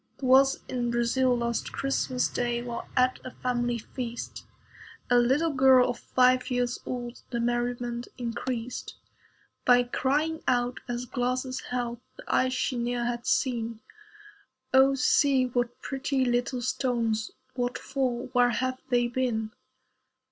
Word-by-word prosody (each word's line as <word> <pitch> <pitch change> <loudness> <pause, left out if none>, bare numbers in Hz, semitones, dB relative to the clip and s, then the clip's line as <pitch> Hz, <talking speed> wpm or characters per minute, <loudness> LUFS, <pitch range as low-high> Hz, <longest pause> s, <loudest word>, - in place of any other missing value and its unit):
(A - - -47
FACT.) - - -40
'Twas 270 +1 +5
in 245 -2 -2
Brazil 240 +2 +2
last 235 -1 -2
Christmas 265 -2 0
day, 240 -1 -1
While 240 -1 -5
at 255 0 +3
a - - -6
family 240 -1 -1
feast, 235 +1 -6 0.6
A 245 - +6
little 275 +7 +2
girl 260 -2 +5
of 240 - -8
five 255 0 +3
years 245 -1 0
old 240 -1 -5
The 235 - -2
merriment 240 0 -1
increased, 240 0 -4 0.7
By 245 0 +5
crying 295 +6 0
out, 245 0 +1
as 245 0 -3
glasses 255 +2 -2
held 240 -1 -2 0.2
The - - -10
ice 255 0 +2
she 255 0 -1
ne'er 240 0 -1
had 240 0 -3
seen, 230 -3 0 0.9
"Oh 265 +1 +6
see! 270 0 +3
what 245 -1 -2
pretty 270 -1 -1
little 245 +1 0
stones. 235 -4 0 0.2
What 245 -1 -2
for? 255 -3 -2
Where 245 -1 +4
have 255 +1 -1
they 240 -1 +3
been?" 235 -3 -1
245 Hz, 140 wpm, -28 LUFS, 240-255 Hz, 0.9 s, A